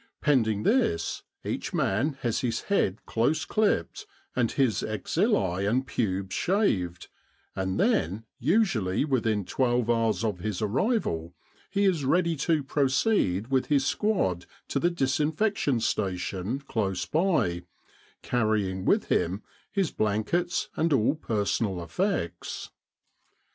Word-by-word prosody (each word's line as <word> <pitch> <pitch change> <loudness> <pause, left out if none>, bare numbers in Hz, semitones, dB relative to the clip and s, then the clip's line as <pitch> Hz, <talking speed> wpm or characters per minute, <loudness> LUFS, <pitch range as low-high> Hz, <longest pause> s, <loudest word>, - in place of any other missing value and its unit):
Pend 135 -7 +3
ing 105 -1 -1
this, 85 - +1 0.2
each - - -3
man 130 +11 +1
has 120 -2 0
his 115 -3 -1
head 110 - 0
close 120 +8 +1
clipped 205 - 0 0.3
and 120 -3 +1
his 130 -6 +1
axillae 110 - 0
and 130 +4 +1
pubes 95 -5 -2
shaved; 90 - 0 0.5
and 95 0 -2
then, 95 +8 +1
usually 135 - +2
within 115 -8 0
12 120 -1 +1
hours 115 -1 +1
of 105 -5 -1
his 105 0 -3
arrival, 105 - 0 0.3
he 200 +1 0
is 175 -7 +2
ready 170 +4 +2
to 155 0 +1
proceed 135 - +1
with 130 -1 +1
his 140 -3 +2
squad 115 - 0 0.2
to - - 0
the 175 - +3
disinfection 150 - +1
station 95 +3 -2
close 105 -8 -2
by, 160 - +1 0.6
carrying 105 -5 0
with - - +3
him 95 +5 0 0.3
his 195 -5 0
blankets, 110 - 0
and 165 +1 +1
all 135 -1 +3
personal 105 - -1
effects. 95 - -3
115 Hz, 120 wpm, -27 LUFS, 95-155 Hz, 0.6 s, Pend